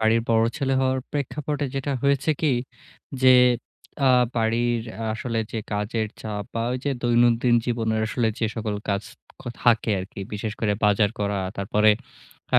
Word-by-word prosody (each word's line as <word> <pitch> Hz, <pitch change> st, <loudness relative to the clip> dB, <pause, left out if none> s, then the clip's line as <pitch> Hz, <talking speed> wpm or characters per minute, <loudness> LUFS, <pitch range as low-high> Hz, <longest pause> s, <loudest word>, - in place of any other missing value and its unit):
বাড়ির 110 Hz, +1 st, +3 dB
বড় 115 Hz, 0 st, +4 dB
ছেলে 135 Hz, -2 st, 0 dB
হওয়ার 130 Hz, 0 st, +1 dB
প্রেক্ষাপটে 145 Hz, 0 st, -2 dB
যেটা 135 Hz, +1 st, -2 dB
হয়েছে 140 Hz, +2 st, +2 dB
কি 150 Hz, -4 st, +2 dB, 0.7 s
যে 130 Hz, -1 st, +8 dB, 0.7 s
আ -, -, +6 dB, 0.3 s
বাড়ির 115 Hz, +1 st, +1 dB, 0.3 s
আসলে 115 Hz, 0 st, -3 dB
যে 115 Hz, -, -2 dB
কাজের 105 Hz, +2 st, -1 dB
চাপ, 105 Hz, -2 st, -4 dB
বা 115 Hz, -, -1 dB
ওই 130 Hz, -, -2 dB
যে 140 Hz, -, +1 dB
দৈনন্দিন 120 Hz, 0 st, +3 dB
জীবনের 115 Hz, -2 st, 0 dB
আসলে 115 Hz, 0 st, 0 dB
যে 115 Hz, -, +1 dB
সকল 110 Hz, -2 st, -2 dB
কাজ 100 Hz, +1 st, 0 dB, 0.4 s
ক -, -, -11 dB, 0.2 s
থাকে 115 Hz, -2 st, +3 dB
আরকি। 95 Hz, +1 st, -8 dB
বিশেষ 105 Hz, +1 st, -3 dB
করে 105 Hz, -2 st, +1 dB
বাজার 105 Hz, 0 st, +3 dB
করা 100 Hz, -1 st, 0 dB, 0.2 s
তারপরে 105 Hz, +2 st, +3 dB, 0.7 s
আ -, -, +8 dB
115 Hz, 155 wpm, -24 LUFS, 110-130 Hz, 0.7 s, যে